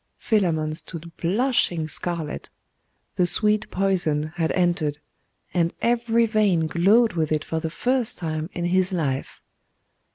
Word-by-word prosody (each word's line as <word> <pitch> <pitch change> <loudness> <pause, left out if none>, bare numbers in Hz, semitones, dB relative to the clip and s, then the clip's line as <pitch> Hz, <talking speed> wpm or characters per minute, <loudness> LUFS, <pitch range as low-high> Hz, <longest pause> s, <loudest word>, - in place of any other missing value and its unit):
Philammon 165 -8 0
stood 165 0 -9
blushing 180 -4 +1
scarlet. 160 -1 -2 0.7
The 180 - +3
sweet 210 +2 +1
poison 170 -6 0
had 165 -2 0
entered, 175 -5 0 0.6
and 170 -2 0
every 235 -1 +2
vein 210 -7 +2
glowed 200 +8 +3
with 160 -2 -1
it 155 0 0
for 160 - -2
the 160 0 -3
first 245 +8 0
time 160 -1 -4
in 175 - -4
his 185 +1 +2
life. 140 -7 -3
175 Hz, 130 wpm, -23 LUFS, 160-210 Hz, 0.7 s, The